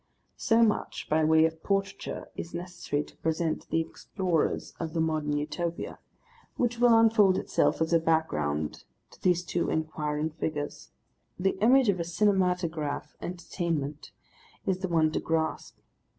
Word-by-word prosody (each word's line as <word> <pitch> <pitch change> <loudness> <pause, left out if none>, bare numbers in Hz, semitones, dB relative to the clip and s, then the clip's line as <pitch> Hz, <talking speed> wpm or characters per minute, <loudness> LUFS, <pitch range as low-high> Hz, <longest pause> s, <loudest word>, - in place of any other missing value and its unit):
So 230 +1 +4
much 215 -2 0
by 155 +1 +3
way 160 +1 +5
of 160 0 -2
portraiture 195 0 -2
is 170 - -6
necessary 175 -4 -3
to - - -18
present 160 0 -1
the 165 - +2
explorers 175 0 -2
of 160 -2 -4
the - - +1
Modern 155 -2 0
Utopia, 165 +3 -3 0.6
which 240 -1 0
will 240 -2 +6
unfold 215 -4 +5
itself - - +1
as 160 +1 +1
a 165 - +6
background 75 - 0 0.3
to - - -18
these 180 -1 +2
two 175 0 -1
enquiring 155 -1 -1
figures. 150 -2 -4 0.5
The 190 +1 +1
image 255 +3 +5
of 190 -3 +1
a - - 0
cinematograph 180 -4 0
entertainment 165 -4 -3 0.5
is 185 -1 0
the 190 - -2
one 160 -2 +3
to - - -1
grasp. 160 -1 -2
165 Hz, 145 wpm, -28 LUFS, 155-190 Hz, 0.6 s, will